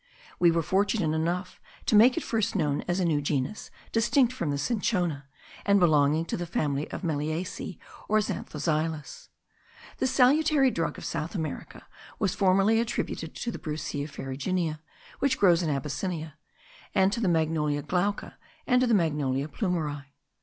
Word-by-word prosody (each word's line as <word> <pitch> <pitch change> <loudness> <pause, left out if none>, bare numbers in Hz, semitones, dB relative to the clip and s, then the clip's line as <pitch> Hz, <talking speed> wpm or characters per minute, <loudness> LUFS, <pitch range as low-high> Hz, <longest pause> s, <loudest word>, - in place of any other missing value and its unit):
We 175 - +6
were 165 0 +1
fortunate 190 -2 +1
enough 175 +3 -2 0.2
to - - 0
make 240 +4 +6
it - - -1
first 225 -1 -1
known 150 -6 +1
as 175 +1 0
a 180 - +1
new 155 -3 +1
genus 145 +7 -2 0.2
distinct 235 +2 +3
from 170 -11 -3
the 140 - 0
cinchona, 180 - -1 0.4
and 200 0 +4
belonging 155 -2 +3
to - - -3
the 175 -1 -4
family 145 -3 -1
of - - -6
meliaceae, 160 +3 -3 0.3
or 215 - +4
of 215 - +3
zanthoxylus. 155 -6 -3 0.7
This 260 - +1
salutary 275 +1 +4
drug 165 -5 -2
of - - -8
South 160 +3 -3
America 160 -4 -5 0.3
was 195 -5 0
formerly 195 +3 +3
attributed 235 +1 -3
to 235 - -3
the - - -7
Brucea 150 -2 -4
ferruginea 155 +5 -3 0.4
which 275 -1 +1
grows 175 -3 +5
in 165 - -1
Abyssinia, 155 +3 -3 0.6
to 195 +4 +3
the 210 - +1
Magnolia 155 -3 +1
glauca, 195 +5 -2 0.3
and 250 -2 +3
to 255 - +3
the 235 - +4
Magnolia 145 -6 0
plumieri. 150 - -3
170 Hz, 155 wpm, -27 LUFS, 150-205 Hz, 0.7 s, We